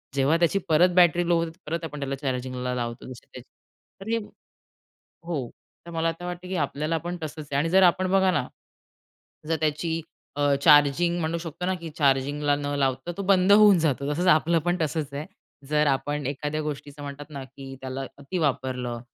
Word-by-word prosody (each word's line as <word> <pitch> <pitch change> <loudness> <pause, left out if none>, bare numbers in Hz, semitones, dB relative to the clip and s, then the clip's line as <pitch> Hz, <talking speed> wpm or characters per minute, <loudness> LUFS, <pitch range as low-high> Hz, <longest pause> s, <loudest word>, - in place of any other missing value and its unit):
जेव्हा 140 +4 +3
त्याची 175 +3 +2
परत 170 +3 +5
बॅटरी 175 -1 +5
लो 175 - +3
होते, 165 +1 -8
परत 165 +2 -3
आपण 150 -2 -6
त्याला 140 0 -2
चार्जिंगला 130 -2 -3
लावतो. 120 0 -4
जशी 125 - -11
त्याची 125 -1 -13 0.5
तर 200 - -7
हे 230 - +2 1.1
हो, 145 -8 -2 0.4
तर 170 - -9
मला 165 0 0
तर 175 - -7
वाटतंय, 180 +1 -6
की 190 - -2
आपल्याला 155 +2 -1
पण 175 +2 -5
तसंच 155 0 -6
आहे 140 - 0
आणि 165 +3 0
जर 190 +2 +5
आपण 185 +1 +3
बघा 190 -1 +4
ना, 125 - -1 1.0
जर 165 - +1
त्याची 160 +2 -1 0.4
अ, 145 -1 +3
चार्जिंग 150 +3 +5
म्हणू 165 +1 -1
शकतो 165 +1 -6
ना, 185 - +1
की 170 -2 -7
चार्जिंगला 145 +1 +2
न 145 - -5
लावता 135 +4 -1
तो 200 - -3
बंद 190 0 +5
होऊन 205 -2 +7
जातो. 145 -3 0
तसच 175 +5 -1
आपलं 165 +2 +2
पण 175 +1 +2
तसंच 155 -2 -2
आहे. 145 +2 -4 0.4
जर 150 0 +2
आपण 145 0 0
एखाद्या 150 +2 -3
गोष्टीचं 145 -1 -6
म्हणतात 145 +1 -8
ना, 140 -2 -6
की 135 0 -10
त्याला 130 0 -5 0.2
अती 145 +6 -4
वापरलं 130 -5 -1
150 Hz, 190 wpm, -25 LUFS, 140-170 Hz, 1.1 s, होऊन